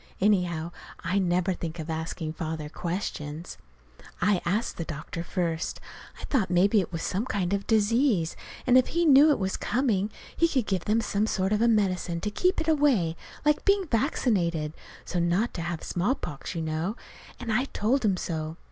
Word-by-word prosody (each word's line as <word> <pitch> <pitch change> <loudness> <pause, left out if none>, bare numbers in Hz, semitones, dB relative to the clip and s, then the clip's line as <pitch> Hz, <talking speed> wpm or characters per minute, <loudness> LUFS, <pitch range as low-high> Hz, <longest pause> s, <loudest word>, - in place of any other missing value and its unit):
Anyhow, 180 -5 +1 0.3
I 180 +4 0
never 180 0 +1
think 170 -1 -5
of 160 -2 -5
asking 160 0 -3
Father 160 -2 -4
questions. 165 -2 -4 0.6
I 200 -2 +2
asked 210 +6 0
the 165 - -2
doctor 160 +2 -6
first. 170 -2 -2 0.4
I - - -10
thought 225 -10 0
maybe 195 +4 +4
't - - -10
was 165 -1 -4
some 195 +4 -1
kind 195 -4 -1
of 200 - +1
a - - -17
disease, 220 - +2 0.3
and 255 0 +7
if 255 - +1
he 340 +1 +1
knew 290 0 +8
it 295 - +4
was 190 -1 -1
coming, 220 -6 +1 0.3
he 335 - +4
could 265 -8 0
give 190 -4 -1
them 220 +2 +2
some 210 -1 0
sort 190 -1 0
of 210 - +1
a 235 - +5
medicine 185 -6 +1
to 210 - -2
keep 365 - +1
it 320 - -3
away 275 - +3 0.3
like 300 0 +3
being 395 -1 +3
vaccinated 195 - 0 0.3
so's 175 - -1
not 175 +7 +1
to 170 - -4
have 170 -1 -4
smallpox, 175 - -2
you 165 - -2
know. 160 +6 -2 0.4
And 230 -3 -2
I 245 +5 +2
told 255 +1 0
him 195 -4 +2
so. 160 -2 -4
190 Hz, 185 wpm, -27 LUFS, 170-230 Hz, 0.6 s, knew